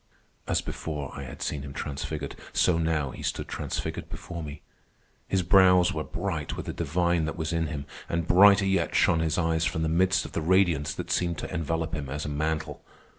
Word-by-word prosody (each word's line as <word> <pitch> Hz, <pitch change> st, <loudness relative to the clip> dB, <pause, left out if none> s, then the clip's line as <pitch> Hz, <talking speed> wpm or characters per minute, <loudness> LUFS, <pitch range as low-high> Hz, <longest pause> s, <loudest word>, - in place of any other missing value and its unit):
As -, -, +1 dB
before 75 Hz, -4 st, -5 dB
I 70 Hz, -1 st, -6 dB
had 60 Hz, -, -7 dB
seen 75 Hz, -, -2 dB
him 70 Hz, -1 st, -7 dB
transfigured, 75 Hz, 0 st, -4 dB, 0.2 s
so 85 Hz, -2 st, +3 dB
now 80 Hz, -4 st, 0 dB
he -, -, -9 dB
stood -, -, -2 dB
transfigured -, -, -4 dB
before 85 Hz, -1 st, -7 dB
me. 75 Hz, -2 st, -8 dB, 0.6 s
His 95 Hz, -1 st, +1 dB
brows 90 Hz, 0 st, +5 dB
were 80 Hz, -, -2 dB
bright 85 Hz, -4 st, -3 dB
with -, -, -5 dB
the -, -, -4 dB
divine 85 Hz, +1 st, +1 dB
that 80 Hz, -, -4 dB
was 80 Hz, 0 st, -2 dB
in 80 Hz, -1 st, 0 dB
him, 70 Hz, -3 st, -5 dB, 0.2 s
and 85 Hz, -1 st, -1 dB
brighter 100 Hz, +2 st, +7 dB
yet 95 Hz, -4 st, +1 dB
shone 85 Hz, -, +4 dB
his 80 Hz, -1 st, 0 dB
eyes 80 Hz, -2 st, +1 dB
from 80 Hz, 0 st, 0 dB
the 80 Hz, -, +1 dB
midst 90 Hz, +3 st, +2 dB
of -, -, -8 dB
the -, -, -2 dB
radiance 85 Hz, -4 st, +3 dB
that -, -, -5 dB
seemed 85 Hz, -2 st, 0 dB
to -, -, -5 dB
envelop 80 Hz, 0 st, -2 dB
him 75 Hz, -4 st, -3 dB
as 75 Hz, +3 st, -4 dB
a -, -, -3 dB
mantle. 80 Hz, +1 st, -2 dB
80 Hz, 205 wpm, -27 LUFS, 75-85 Hz, 0.6 s, brighter